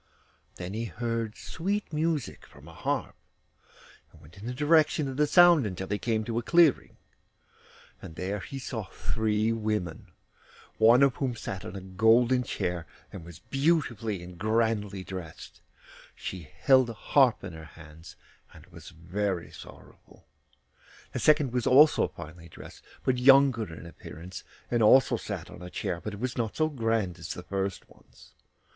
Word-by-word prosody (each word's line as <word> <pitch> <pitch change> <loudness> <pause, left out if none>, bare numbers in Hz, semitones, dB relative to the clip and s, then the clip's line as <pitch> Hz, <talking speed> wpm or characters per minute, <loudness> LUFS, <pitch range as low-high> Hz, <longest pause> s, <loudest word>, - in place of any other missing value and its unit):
Then 90 +2 -6
he 115 +2 -3
heard 115 -1 -3
sweet 200 +1 -3
music 155 -3 -2
from - - -17
a - - -12
harp, - - -3 1.0
and - - -19
went 75 +3 -17
in 100 +4 -9
the - - -2
direction 150 0 +3
of 135 - -5
the 150 +2 +2
sound 175 -3 +6
until 95 -1 -5
he 105 0 -1
came 110 -2 -1
to 115 +1 -2
a - - -3
clearing, 170 +2 +3 1.0
and 80 - -10
there 95 +4 -3
he 135 - -8
saw 120 -5 -5
three 110 +2 -1
women, 105 -7 -3 0.7
one 115 +4 +6
of 140 -2 +2
whom 130 -4 -2
sat 95 -4 -6
on - - -8
a 95 - -6
golden 115 +7 +3
chair, 90 -8 -3 0.3
and 90 - -8
was 85 -1 -11
beautifully 120 - -1
and 90 -1 -11
grandly 110 -2 0
dressed; 90 -4 -9 0.5
she 85 -5 -7
held 130 -3 +5
a - - -5
harp 130 +2 +2
in 95 -3 -7
her 80 0 -10
hands, 80 +1 -13 0.4
and - - -14
was - - -12
very 90 +2 -3
sorrowful. - - -15 0.9
The - - -4
second 150 -5 +3
was 125 -2 0
also 150 +4 +6
finely 85 +1 -11
dressed, - - -13 0.2
but 125 -1 +1
younger 130 -6 +5
in 80 - -10
appearance, 85 +1 -10 0.3
and 120 -1 +2
also 130 +5 +6
sat - - -6
on - - -12
a 90 - -8
chair, 85 -1 -4
but 105 - -5
it - - -11
was 125 +1 -3
not 110 -2 -2
so 155 0 +2
grand 115 - -1
as - - -6
the - - -8
first 95 -1 -4
one's. - - -20
110 Hz, 165 wpm, -28 LUFS, 95-130 Hz, 1.0 s, sound